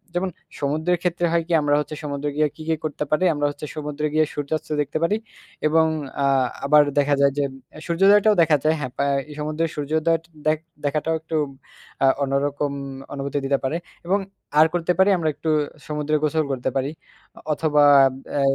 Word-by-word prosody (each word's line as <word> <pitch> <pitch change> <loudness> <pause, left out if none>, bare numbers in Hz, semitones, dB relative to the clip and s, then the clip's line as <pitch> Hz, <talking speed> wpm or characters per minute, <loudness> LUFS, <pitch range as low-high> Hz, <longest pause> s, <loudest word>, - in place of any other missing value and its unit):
যেমন 185 +1 0 0.3
সমুদ্রের 155 +5 0
ক্ষেত্রে 175 -1 0
হয় 170 -1 +2
কি? - - -7
আমরা 145 0 +2
হচ্ছে 150 +1 -4
সমুদ্রে 145 0 -3
গিয়ে 150 0 +3
কি, - - -12
কি, - - +3
করতে 150 -1 -2
পারি? 155 +4 +2
আমরা 145 0 -1
হচ্ছে 145 +1 -8
সমুদ্রে 150 0 -3
গিয়ে 155 0 +4
সূর্যাস্ত 145 +2 -3
দেখতে 145 +2 -2
পারি 205 +5 +2 0.5
এবং 160 +1 +4 0.4
আ - - +3 0.4
আবার 150 +1 +6
দেখা 145 0 +3
যায় 140 0 +5
যে, 145 - +2 0.4
সূর্যোদয়টাও 200 +5 +5
দেখা 155 -2 +4
যায়। 155 +1 +3
হ্যাঁ, 130 -3 -4
পা 140 - +1 0.3
এই - - -8
সমুদ্রের 155 +2 -1
সূর্যোদয়ট 160 +3 0 0.2
দেখ 155 0 +3 0.3
দেখাটাও 155 +3 0
একটু 160 0 -5 0.7
আ - - +6 0.2
অন্যরকম 140 +1 -1 0.4
অনুভূতি 140 +1 -3
দিতে 140 0 +2
পারে। 150 +5 0 0.3
এবং 195 +3 +2 0.4
আর 155 - +8
করতে 175 0 +1
পারি 190 +2 +6
আমরা 160 -2 0
একটু 160 - -4 0.4
সমুদ্রে 150 0 -1
গোসল 155 +1 +1
করতে 130 0 -1
পারি। 135 +1 0 0.5
অ - - -11
অথবা 150 -1 +2 0.5
অ্যা 145 - 0
150 Hz, 180 wpm, -23 LUFS, 145-160 Hz, 0.7 s, আর